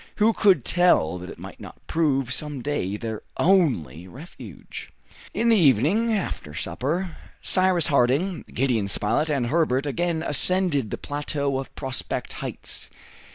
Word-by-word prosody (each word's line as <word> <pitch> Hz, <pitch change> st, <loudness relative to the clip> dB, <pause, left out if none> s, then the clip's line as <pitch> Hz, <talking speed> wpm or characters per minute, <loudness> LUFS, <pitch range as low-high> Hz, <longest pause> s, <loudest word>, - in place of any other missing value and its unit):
Who 220 Hz, +1 st, +3 dB
could 185 Hz, -, +3 dB
tell 165 Hz, -, +3 dB
that 90 Hz, +1 st, -8 dB
it -, -, -9 dB
might -, -, -10 dB
not -, -, -12 dB
prove 135 Hz, -6 st, +1 dB
some 145 Hz, -4 st, -4 dB
day 105 Hz, -9 st, -2 dB
their 110 Hz, -1 st, -5 dB, 0.2 s
only 120 Hz, -, +2 dB
refuge? 140 Hz, -, -10 dB, 0.4 s
In 235 Hz, -, 0 dB
the 230 Hz, -, +6 dB
evening, 165 Hz, -, +3 dB
after 180 Hz, -, -3 dB
supper, 160 Hz, -, -3 dB, 0.3 s
Cyrus 185 Hz, -2 st, +3 dB
Harding, 145 Hz, +6 st, +1 dB
Gideon 120 Hz, -5 st, 0 dB
Spilett, 105 Hz, +10 st, 0 dB
and 140 Hz, -5 st, 0 dB
Herbert 140 Hz, -1 st, +1 dB
again 165 Hz, +2 st, -1 dB
ascended 150 Hz, -, +2 dB
the -, -, -4 dB
plateau 145 Hz, -1 st, -2 dB
of 135 Hz, -, -8 dB
Prospect 130 Hz, -2 st, -3 dB
Heights. -, -, -6 dB
145 Hz, 140 wpm, -24 LUFS, 120-175 Hz, 0.4 s, the